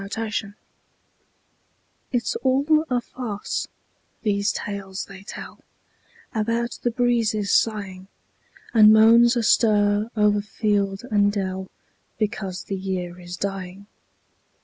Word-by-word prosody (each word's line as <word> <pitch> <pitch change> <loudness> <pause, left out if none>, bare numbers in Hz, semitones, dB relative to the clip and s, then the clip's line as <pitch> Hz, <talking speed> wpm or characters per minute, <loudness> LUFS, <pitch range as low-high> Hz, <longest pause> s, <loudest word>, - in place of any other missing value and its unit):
MERRY 195 - -7
AUTUMN 215 -2 -3 1.6
It's 245 -3 -1
all 285 +4 +2
a 250 -1 +1
farce, 230 -4 -4 0.6
these 200 -1 +1
tales 195 -1 -5
they 195 -1 -12
tell 200 - -9 0.7
About 230 +2 -1
the 240 - +1
breezes 230 -4 +1
sighing, 195 -4 0 0.7
And 215 -2 +8
moans 230 +3 +6
astir 210 -2 +3
o'er 210 -1 +3
field 205 -1 -1
and 205 -1 +3
dell, 190 -2 -3 0.5
Because 200 -4 -3
the 195 - -4
year 180 -2 -4
is 175 0 -8
dying. 195 0 -5
210 Hz, 105 wpm, -23 LUFS, 195-230 Hz, 1.6 s, And